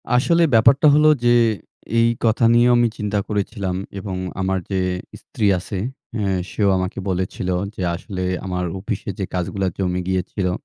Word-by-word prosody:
আসলে 170 Hz, +7 st, +3 dB
ব্যাপারটা 125 Hz, +7 st, +5 dB
হলো 150 Hz, +1 st, +5 dB, 0.2 s
যে 120 Hz, 0 st, +5 dB, 0.6 s
এই 115 Hz, -, +5 dB, 0.2 s
কথা 115 Hz, +1 st, +3 dB
নিয়েও 120 Hz, +1 st, +5 dB
আমি 120 Hz, 0 st, +4 dB
চিন্তা 105 Hz, 0 st, -1 dB
করেছিলাম 100 Hz, -2 st, -2 dB, 0.2 s
এবং 95 Hz, -1 st, -5 dB, 0.3 s
আমার 95 Hz, 0 st, 0 dB
যে 95 Hz, -, +1 dB, 0.4 s
স্ত্রী 105 Hz, -, -2 dB
আছে 95 Hz, +3 st, -6 dB, 0.4 s
হে 105 Hz, -, -1 dB, 0.3 s
সেও 100 Hz, -2 st, +1 dB
আমাকে 95 Hz, 0 st, -3 dB
বলেছিলো 90 Hz, 0 st, -2 dB, 0.2 s
যে -, -, -6 dB
আসলে 95 Hz, +1 st, -5 dB, 0.2 s
আমার 90 Hz, -1 st, -2 dB
অফিসে 105 Hz, +1 st, -4 dB
যে 95 Hz, -, -1 dB
কাজগুলা 95 Hz, +2 st, -1 dB
জমে 90 Hz, -1 st, -1 dB
গিয়েছিলো 95 Hz, 0 st, -1 dB
100 Hz, 150 wpm, -21 LUFS, 95-115 Hz, 0.6 s, ব্যাপারটা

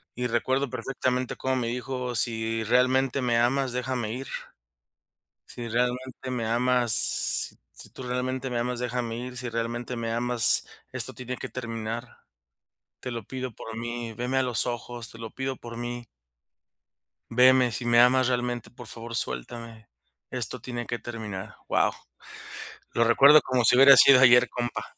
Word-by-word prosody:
Y 125 Hz, -, -4 dB
y -, -, +1 dB
recuerdo 130 Hz, +3 st, 0 dB
perfectamente 130 Hz, -1 st, -2 dB
cómo 130 Hz, 0 st, -1 dB
me 120 Hz, -2 st, -1 dB
dijo: 125 Hz, 0 st, -4 dB
"Si 115 Hz, 0 st, -1 dB
realmente 130 Hz, +3 st, +2 dB
me 120 Hz, -2 st, +1 dB
amas, 125 Hz, +1 st, +1 dB
déjame 125 Hz, -3 st, -2 dB
ir. 135 Hz, +2 st, -6 dB, 1.2 s
Si 120 Hz, -1 st, -7 dB
realmente 125 Hz, +2 st, -2 dB
me 120 Hz, -3 st, -2 dB
amas, 120 Hz, -1 st, +1 dB
si -, -, -12 dB
tú 130 Hz, -, -10 dB
realmente 130 Hz, +1 st, -3 dB
me 120 Hz, -, -2 dB
amas, 125 Hz, 0 st, -2 dB
déjame 120 Hz, -2 st, -3 dB
ir. 125 Hz, +1 st, -7 dB
Si 125 Hz, -1 st, -4 dB
realmente 120 Hz, +2 st, -3 dB
me 115 Hz, -1 st, -3 dB
amas, 120 Hz, -1 st, +4 dB, 0.3 s
esto -, -, -1 dB
tiene 125 Hz, 0 st, -6 dB
que -, -, -7 dB
terminar. 115 Hz, -1 st, -6 dB, 0.8 s
Te 125 Hz, -, -5 dB
lo 115 Hz, -3 st, -5 dB
pido 130 Hz, 0 st, -6 dB
por 110 Hz, +1 st, -9 dB
mí, 120 Hz, 0 st, -5 dB
veme 125 Hz, +4 st, -3 dB
a -, -, +3 dB
los 125 Hz, -1 st, -1 dB
ojos, 120 Hz, -1 st, -5 dB
te 115 Hz, -, -13 dB
lo 115 Hz, -1 st, -7 dB
pido 135 Hz, -1 st, -4 dB
por 115 Hz, -1 st, -10 dB
mí". 120 Hz, 0 st, -5 dB, 1.3 s
"Veme, 125 Hz, +1 st, +5 dB
si 120 Hz, -, -4 dB
me 120 Hz, 0 st, +5 dB
amas 130 Hz, +1 st, +5 dB
realmente, 120 Hz, -1 st, -2 dB
por 120 Hz, -1 st, -12 dB
favor 115 Hz, +1 st, -8 dB
suéltame, 110 Hz, -, -6 dB, 0.4 s
esto 125 Hz, -1 st, -4 dB
tiene 120 Hz, -2 st, -5 dB
que 120 Hz, -, -3 dB
terminar", 105 Hz, -3 st, -7 dB
wao, -, -, +2 dB, 1.0 s
lo 115 Hz, -, +2 dB
recuerdo 140 Hz, +6 st, +7 dB
como 125 Hz, -2 st, 0 dB
si 125 Hz, -, +5 dB
hubiera 135 Hz, +1 st, +9 dB
sido 135 Hz, -2 st, +8 dB
ayer, 125 Hz, -1 st, +7 dB
compa. 120 Hz, -1 st, -3 dB
120 Hz, 160 wpm, -26 LUFS, 115-125 Hz, 1.3 s, hubiera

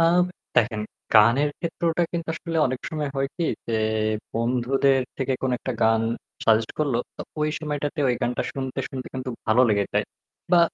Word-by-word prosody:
আ -, -, +5 dB, 0.5 s
দেখেন, 110 Hz, -2 st, +3 dB, 0.3 s
গানের 120 Hz, +7 st, +6 dB
ক্ষেত্রটা 170 Hz, 0 st, 0 dB
কিন্তু 170 Hz, -1 st, -3 dB
আসলে 170 Hz, -1 st, -4 dB
অনেক 130 Hz, -1 st, -3 dB
সময় 150 Hz, -3 st, -2 dB
হয় 135 Hz, 0 st, +1 dB
কি 170 Hz, -, 0 dB, 0.2 s
যে 115 Hz, -1 st, 0 dB, 0.6 s
বন্ধুদের 130 Hz, +3 st, +2 dB, 0.2 s
থেকে 135 Hz, -1 st, 0 dB
কোন 130 Hz, -, +1 dB
একটা 130 Hz, -, -3 dB
গান 110 Hz, 0 st, +4 dB, 0.4 s
সাজেস্ট 110 Hz, 0 st, +4 dB
করলো, 140 Hz, -6 st, +1 dB, 0.2 s
তো -, -, -8 dB, 0.2 s
ওই 150 Hz, 0 st, +2 dB
সময়টাতে 150 Hz, -1 st, -3 dB
ওই 125 Hz, -, +3 dB
গানটা 125 Hz, -, 0 dB
শুনতে, 130 Hz, -1 st, -4 dB
শুনতে 130 Hz, -1 st, -6 dB
কিন্তু 130 Hz, 0 st, -3 dB, 0.2 s
ভালো 115 Hz, +3 st, +5 dB
লেগে 100 Hz, -2 st, +3 dB
যায়। -, -, +2 dB, 0.5 s
বা 175 Hz, -, +8 dB
130 Hz, 170 wpm, -25 LUFS, 115-150 Hz, 0.6 s, বা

